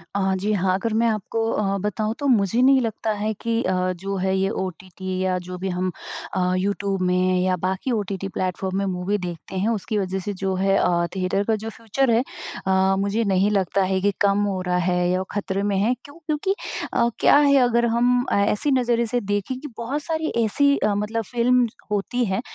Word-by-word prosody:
अ, 195 -1 +1
जी 205 +3 -1
हाँ, 185 -2 +1
अगर 215 +3 -2
मैं 235 - +3
आपको 220 0 -2
अ, 200 -1 0
बताऊँ 215 +2 -1
तो 285 - -1
मुझे 230 -1 +3
नहीं 265 0 +6
लगता 220 -1 -2
है 210 +1 -2
कि 230 0 0
अ, 185 - 0 0.2
जो 195 +3 -4
है 190 +1 0
ये 195 +1 +1
ओटीटी 185 0 -5
या 185 -1 +1
जो 180 0 -6
भी 190 +2 -3
हम 185 0 -1 0.4
अ, 180 0 +1
यूट्यूब 195 0 -1
में 185 0 +2
या 185 0 +2
बाकी 190 +7 -1
ओटीटी 200 -4 -2
प्लेटफ़ॉर्म 185 0 -2
में 200 - 0
मूवी 190 +2 -1
देखते 175 -1 -7
हैं 195 +4 +1
उसकी 220 -1 -2
वज़ह 190 -1 -1
से 205 +2 -4
जो 190 0 -2
है, 195 +1 +2
अ, 170 -1 +2
थिएटर 190 +2 0
का 220 +1 +1
जो 220 +1 -5
फ़्यूचर 230 +3 -1
है, 230 +3 +3 0.4
अ, 190 0 +3
मुझे 200 +3 0
नहीं 195 0 +2
लगता 195 -1 +1
है 190 0 +1
कि 205 +1 +2
कम 200 0 +3
हो 195 -2 -1
रहा 180 -1 0
है 180 0 +1
या 185 +1 +1
वो 190 - -3
ख़तरे 200 -1 -2
में 205 -1 0
है 215 +6 +2
क्यों? 285 - -13
क्योंकि 315 +6 0 0.4
अ, 235 - +3
क्या - - +6
है 285 -1 +5
अगर 235 -1 +2
हम 245 +2 +2
ए 200 - +3
ऐसे 280 +8 0
नज़रिए 240 -3 +2
से 245 +2 0
देखें 205 +5 -2
कि 295 - -7
बहुत 260 +6 -3
सारी 320 0 -1 0.2
ऐसी 280 +6 +3
अ, 210 - +1
मतलब 220 +2 -1
फ़िल्म 245 +2 +2 0.2
होती 225 +5 0
हैं, 190 +1 -1
200 Hz, 215 wpm, -23 LUFS, 190-230 Hz, 0.4 s, नहीं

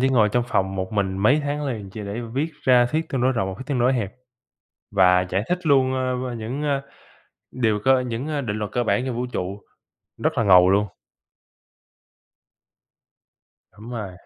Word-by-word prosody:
chỉ 130 - +3
ngồi 115 -5 +4
trong 120 +3 0
phòng 95 -3 0
một 95 +1 -4
mình 95 -2 -1
mấy 130 +10 +4
tháng 145 +1 -2
liền 110 -7 -5
chỉ 110 - -8
để 100 +4 -4
viết 150 +5 -1
ra 125 -2 +5
thuyết 160 +5 -2
tương 130 - -2
đối 130 +1 +3
rộng 95 -5 -1
và 95 - -5
thuyết 130 - -8
tương 140 -4 -1
đối 125 +2 +3
hẹp 110 -6 -2 0.8
và 90 -2 +5
giải 95 +2 0
thích 180 0 +1
luôn, 135 -3 +3
ơ, 130 -1 -2
ơ, 120 - -5
những, 120 +6 -4
ơ, 140 -2 0 0.7
điều 110 -4 0
cơ 130 -1 +5
những, 120 +4 -4
ơ, 150 -2 -2
định 110 -5 -3
luật 105 -1 -4
cơ 120 - 0
bản 125 +2 +1
trong 130 -3 -3
vũ 120 +1 -2
trụ, 95 +3 -4 0.6
rất - - 0
là - - +3
ngầu 90 -2 +6
luôn. 100 +2 +3 2.8
Đúng 105 +4 -12
rồi. 105 -6 -5
120 Hz, 200 wpm, -23 LUFS, 100-130 Hz, 2.8 s, ngầu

